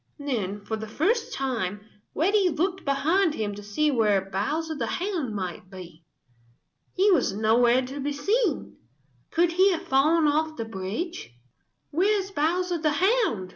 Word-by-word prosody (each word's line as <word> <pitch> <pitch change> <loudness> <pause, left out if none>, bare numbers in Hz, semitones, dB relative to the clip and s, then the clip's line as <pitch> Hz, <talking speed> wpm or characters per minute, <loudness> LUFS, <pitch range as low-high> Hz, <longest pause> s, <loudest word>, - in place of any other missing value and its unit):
Then 210 -9 -3
for 220 - -3
the 220 0 -6
first 410 - 0
time 225 -7 -2 0.3
Reddy 385 +4 +3
looked 365 +4 -1
behind 310 +5 +1
him 210 -2 -2
to 205 - -8
see 210 +10 0
where 205 -6 +1
Bowser 310 - -2
the 250 -7 -3
Hound 340 - -2
might 185 -1 -5
be. 175 -4 -11 0.9
He 395 +2 +4
was 275 - +2
nowhere 235 +4 +3
to 270 +3 -7
be 285 +1 -2
seen. 395 - -1 0.5
Could 340 +1 +2
he 375 +3 +4
have 330 - -4
fallen 305 +5 +3
off 310 +1 +1
the 230 - -3
bridge? 220 - -5 0.6
"Where 390 +7 +2
is 390 0 -6
Bowser 350 +2 0
the 305 -1 +1
Hound?" 370 - +1
290 Hz, 155 wpm, -26 LUFS, 215-355 Hz, 0.9 s, He